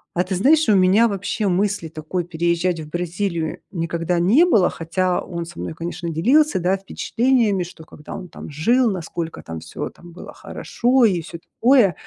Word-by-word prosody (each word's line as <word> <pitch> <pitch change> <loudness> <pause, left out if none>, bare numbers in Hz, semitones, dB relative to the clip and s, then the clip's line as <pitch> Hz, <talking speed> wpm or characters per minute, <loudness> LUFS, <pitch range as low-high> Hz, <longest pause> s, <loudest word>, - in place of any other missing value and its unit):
А - - -2
ты 190 +1 -4
знаешь, 295 - +4
у 205 - +6
меня 190 +5 +5
вообще 200 +1 -2
мысли 190 -2 0
такой 160 +3 -4
переезжать 170 +1 0
в 155 -1 -8
Бразилию 175 -1 -2
никогда 170 0 -2
не 235 - +5
было, 215 - +3
хотя 175 +2 0
он 170 -2 -5
со 170 0 -11
мной, - - -4
конечно, 170 +1 -5
делился, 240 - +3
да, 180 +2 +1
впечатлениями, 220 0 +1
что, 170 -2 -11
когда 150 - -10
он 180 - -7
там - - -10
жил, 230 - +2
насколько 170 -2 -5
там 80 -1 -7
всё 85 - -6
там 175 -1 -15
было 175 - -11
хорошо 245 0 +1
и 180 -5 +2
всё 170 - -9
такое. 230 - +3
180 Hz, 180 wpm, -21 LUFS, 165-205 Hz, -, у